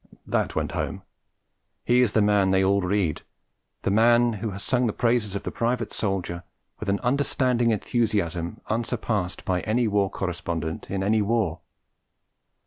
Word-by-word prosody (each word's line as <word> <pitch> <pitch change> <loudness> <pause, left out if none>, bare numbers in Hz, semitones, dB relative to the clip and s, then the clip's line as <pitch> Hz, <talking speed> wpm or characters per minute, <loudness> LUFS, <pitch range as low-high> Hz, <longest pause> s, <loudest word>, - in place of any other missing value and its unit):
That - - -1
went - - -1
home; - - -3 0.8
he 125 +1 +4
is 120 -5 +2
the 110 - +4
man 105 -2 +3
they 95 0 +3
all 100 +1 +3
read, 90 -4 0 0.6
the - - +1
man 120 +2 +4
who 110 +1 -3
has 100 0 -6
sung 125 -2 +1
the 110 - -1
praises 115 -4 +1
of 100 - -3
the - - -4
private 120 0 -1
soldier 95 -4 -2 0.4
with 110 - -4
an 100 0 +1
understanding 125 -2 +1
enthusiasm 100 -6 -1
unsurpassed 110 -4 -2
by 90 -1 +1
any 115 +2 +1
war 100 -2 +2
correspondent 85 -4 -4
in 95 -1 -2
any 105 +2 +2
war. 110 +1 0
105 Hz, 155 wpm, -25 LUFS, 95-115 Hz, 0.8 s, he